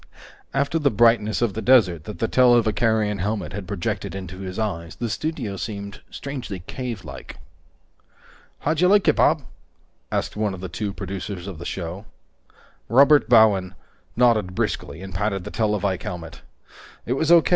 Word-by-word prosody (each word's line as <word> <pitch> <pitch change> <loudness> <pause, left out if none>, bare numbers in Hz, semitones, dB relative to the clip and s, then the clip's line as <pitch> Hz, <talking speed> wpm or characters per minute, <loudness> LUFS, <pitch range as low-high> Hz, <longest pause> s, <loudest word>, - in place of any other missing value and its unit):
After 140 +4 0
the 145 -2 +3
brightness 115 -1 +3
of 115 -4 +1
the 110 - -4
desert 100 - +4
that 105 - -7
the 115 - 0
televicarion 110 -4 +3
helmet 105 +3 -2
had 100 -2 -6
projected 95 0 -3
into 95 -1 -7
his 95 -1 -6
eyes, 85 -7 -3
the 120 -2 -3
studio 125 -7 -3
seemed 100 0 -6
strangely 130 -10 -6
cavelike. 115 -11 -7 1.2
"How'd 160 +2 0
you 180 - +6
like 205 +1 +4
it, - - +5
Bob?" - - +3 0.7
asked - - -2
one 105 -2 -1
of - - -10
the 95 0 -6
two 100 +4 -3
producers 95 0 -6
of 95 -5 -7
the 85 - -8
show. 90 +3 -5 0.8
Robert 140 +5 +6
Bowen 100 -6 +5 0.4
nodded 110 -6 +3
briskly 80 0 -3
and 95 -1 -8
patted 100 0 -1
the - - -7
televike 105 -4 0
helmet. 85 -4 -7 0.6
"It 120 - 0
was 160 +4 +1
O. 170 -2 +8
105 Hz, 155 wpm, -23 LUFS, 95-120 Hz, 1.2 s, O